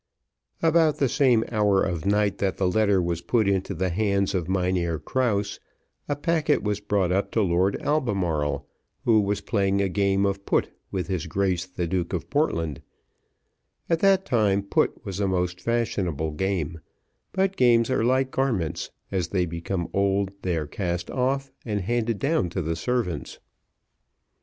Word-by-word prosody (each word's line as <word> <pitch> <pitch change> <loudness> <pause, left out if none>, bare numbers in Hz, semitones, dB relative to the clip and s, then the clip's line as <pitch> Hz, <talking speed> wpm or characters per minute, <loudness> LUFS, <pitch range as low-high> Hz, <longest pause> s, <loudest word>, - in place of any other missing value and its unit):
About 160 -2 +4
the 140 - +2
same 125 -3 +3
hour 105 -3 +3
of 90 -1 -2
night 105 0 +2
that 95 -2 0
the 95 - +1
letter 100 0 +3
was 85 -1 -1
put 110 +2 +1
into 100 0 0
the 95 +3 0
hands 100 0 +1
of 90 -2 -2
Mynheer 90 -3 0
Krause, 105 - -1 0.5
a 145 - +1
packet 155 0 +1
was 105 -1 -1
brought 100 -3 0
up 95 +2 +1
to 110 - +3
Lord 95 +2 +1
Albemarle, 95 - 0 0.4
who 110 -2 +5
was 100 0 -1
playing 100 -2 +1
a 100 - +2
game 100 +1 +2
of 100 0 -1
put - - +1 0.2
with 95 -3 -2
his 90 -2 -3
Grace 95 0 0
the 90 -1 -3
Duke 90 +1 -2
of 90 - -4
Portland; 85 - 0 1.1
at 165 - +3
that 195 0 +4
time 100 -4 +2
put 100 - 0
was 95 0 -4
a 100 - +1
most 90 -1 -1
fashionable 90 -9 -1
game; 85 -1 -2 0.5
but 190 0 0
games 120 -3 +4
are 130 - +1
like 130 +2 +2
garments, 95 - -1 0.2
as 95 -4 0
they 90 0 0
become 85 +1 -3
old 100 0 +1
they 90 -3 -1
are 75 - -2
cast 85 +2 -3
off, 135 +1 -1
and 105 -3 -2
handed 115 +2 0
down 140 - +1
to 90 +1 -3
the 80 +1 -1
servants. 90 -3 -2
100 Hz, 165 wpm, -25 LUFS, 90-115 Hz, 1.1 s, who